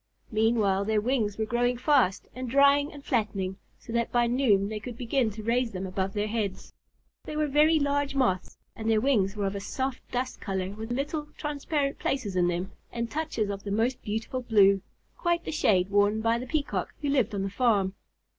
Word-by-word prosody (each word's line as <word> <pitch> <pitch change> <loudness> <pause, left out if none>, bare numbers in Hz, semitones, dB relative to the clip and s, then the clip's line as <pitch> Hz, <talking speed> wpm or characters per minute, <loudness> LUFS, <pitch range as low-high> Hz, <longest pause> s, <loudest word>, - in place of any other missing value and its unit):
Meanwhile 215 -3 +2
their 215 0 +2
wings 220 -3 0
were 220 - 0
growing 245 +2 +1
fast, 250 -8 +2
and 255 -1 -5
drying, 280 +3 +4
and 285 -1 -12
flattening, 195 -5 -1 0.2
so 230 - -10
that 235 0 0
by 240 -1 +3
noon 235 -5 +3
they 215 0 -4
could 230 +2 -8
begin 245 0 +1
to 215 +1 -8
raise 235 +1 +1
them 185 0 -4
above 190 +1 -2
their 210 0 -1
heads. 210 -4 -3 0.5
They 305 - -6
were 305 - +2
very 300 +3 +4
large 285 -1 0
Moths 190 -9 0 0.2
and 225 0 -3
their 220 -1 +4
wings 215 -6 +2
were 205 -1 -1
of 195 - -1
a 200 - -3
soft 260 +6 -3
dust 250 +1 -3
color 190 -1 -2
with 220 +3 -7
little 295 +4 -2
clear, 300 - -27
transparent 290 -1 -2
places 215 -8 -2
in 180 -1 +3
them 175 +2 -2 0.2
and 235 -1 -3
touches 290 -10 -1
of 200 0 -5
the 205 - -5
most 230 +5 0
beautiful 225 +4 -3
blue, 200 -5 +4 0.4
quite 345 -1 +1
the - - -3
shade 195 - +2
worn 205 +1 +3
by 230 +1 +2
the 255 - -6
Peacock, 295 0 -2
who 285 - +1
lived 245 -7 +1
on 195 - -1
the 195 - -3
farm. 205 -4 +2
225 Hz, 205 wpm, -28 LUFS, 200-270 Hz, 0.5 s, drying